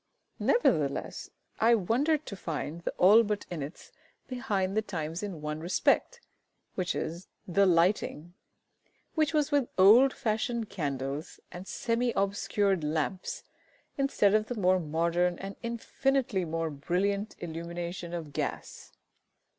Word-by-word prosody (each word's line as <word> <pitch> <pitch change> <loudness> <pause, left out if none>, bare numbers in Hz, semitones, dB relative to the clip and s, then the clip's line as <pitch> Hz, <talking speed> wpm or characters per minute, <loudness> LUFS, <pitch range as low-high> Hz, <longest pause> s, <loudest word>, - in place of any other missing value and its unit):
Nevertheless, 485 - +1 0.3
I 230 +1 +5
wondered 275 - +1
to 200 - -6
find 165 -2 -4
the - - -3
ALLBUTT 210 +2 +5
INNETTS 155 -1 -7 0.4
behind 205 -7 -1
the 215 - +3
times 165 -5 -4
in 195 -7 -5
one 150 0 -3
respect, 190 - +1 0.5
viz., 175 -1 -3 0.2
the 195 +2 +3
lighting, 175 -1 +1 0.8
which 310 -2 +2
was 300 -2 +2
with 285 -4 +2
old 225 +8 +7
fashioned 225 0 -2
candles 140 -2 -4
and 180 +2 -9
semi 240 0 0
obscured 200 -2 +1
lamps, 160 - -2 0.5
instead 275 -8 +2
of 215 0 +2
the 245 - -4
more 185 -3 +3
modern 170 +2 0
and 195 +1 -7
infinitely 235 -2 0
more 165 0 -2
brilliant 195 +8 -1
illumination 170 +1 -5
of 165 -4 -6
gas! - - -5
190 Hz, 120 wpm, -29 LUFS, 170-225 Hz, 0.8 s, old